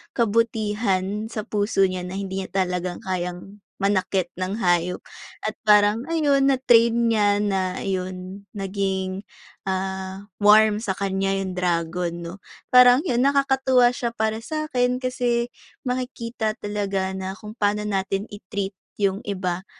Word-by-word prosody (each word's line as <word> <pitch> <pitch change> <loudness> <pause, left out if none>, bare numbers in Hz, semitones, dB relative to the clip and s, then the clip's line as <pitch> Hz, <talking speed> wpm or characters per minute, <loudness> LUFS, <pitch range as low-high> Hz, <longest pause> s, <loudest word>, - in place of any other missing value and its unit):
kabutihan 210 -3 0
sa 220 -1 -5
puso 205 -2 +1
niya 185 -1 -1
na 185 - -6
hindi 195 -1 -3
niya 190 - -5
talagang 180 0 -4
kayang 180 +2 -4 0.2
manakit 190 -2 +1
ng 190 +4 -3
hayop 175 0 +1 0.4
at 215 0 -3
parang, 210 +2 +5
ayun, 290 -4 +2
na-train 240 -4 +4 0.2
niya 205 -2 +3
na 190 -3 -1
yun, 185 +1 -4
naging, 195 -1 -2 0.4
ah, 190 +1 -4
warm 210 0 +6
sa 215 -3 -2
kanya 195 0 -1
yung 185 -1 -5
dragon, 175 -1 -1
'no? 170 0 -6 0.4
Parang 250 +1 +7
yun 255 -6 +1
nakakatuwa 265 -3 +4
siya 240 -1 -3
para 220 -1 0
sa'kin 250 -2 -1
kasi 245 -2 0 0.3
makikita 245 -3 -3
talaga 200 -2 -2
na 190 0 -4
kung 210 +3 -11
paano 205 0 +1
natin 195 0 -2
i-treat 200 -1 -5 0.2
yung 195 -1 +2
iba, 185 -2 -3
205 Hz, 130 wpm, -23 LUFS, 190-230 Hz, 0.4 s, Parang